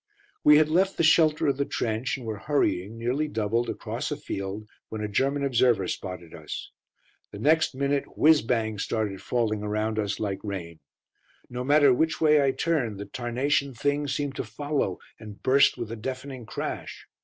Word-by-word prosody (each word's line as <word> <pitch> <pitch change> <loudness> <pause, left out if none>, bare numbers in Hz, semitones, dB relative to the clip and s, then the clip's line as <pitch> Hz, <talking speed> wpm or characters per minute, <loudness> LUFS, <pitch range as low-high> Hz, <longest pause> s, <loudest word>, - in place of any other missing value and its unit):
We 150 0 +8
had 155 0 +5
left 190 +4 +2
the - - +2
shelter 155 -1 +4
of 140 -3 +1
the 140 - +1
trench, 115 +2 -2
and 125 - -9
were 110 -2 -4
hurrying, 115 -7 0
nearly 125 +6 -1
doubled, 115 -2 -1
across - - -4
a - - -3
field, 100 +2 -5 0.2
when 110 - -5
a - - -1
German 135 +7 0
observer 120 -7 +3
spotted 90 -4 -6
us. 80 - -7 0.6
The - - -9
next 155 +5 +2
minute 140 +1 0
"whizz 155 0 +6
bangs" 110 -3 -1
started 105 -4 -2
falling 110 -4 -1
around 110 +1 -1
us 105 -1 -2
like 100 -3 -2
rain. 85 -6 -6 0.7
No 125 0 -3
matter 145 0 +5
which 160 +5 +1
way 150 -2 +5
I 135 - +3
turned, 130 -9 -1
the 100 - -5
tarnation 135 +4 -1
things 145 +2 0
seemed 145 -2 -2
to - - -1
follow 135 -3 -2 0.2
and 105 -2 -10
burst 135 0 +4
with 120 -2 -5
a - - -3
deafening 130 +1 -6
crash. - - -5
125 Hz, 180 wpm, -26 LUFS, 105-145 Hz, 0.7 s, We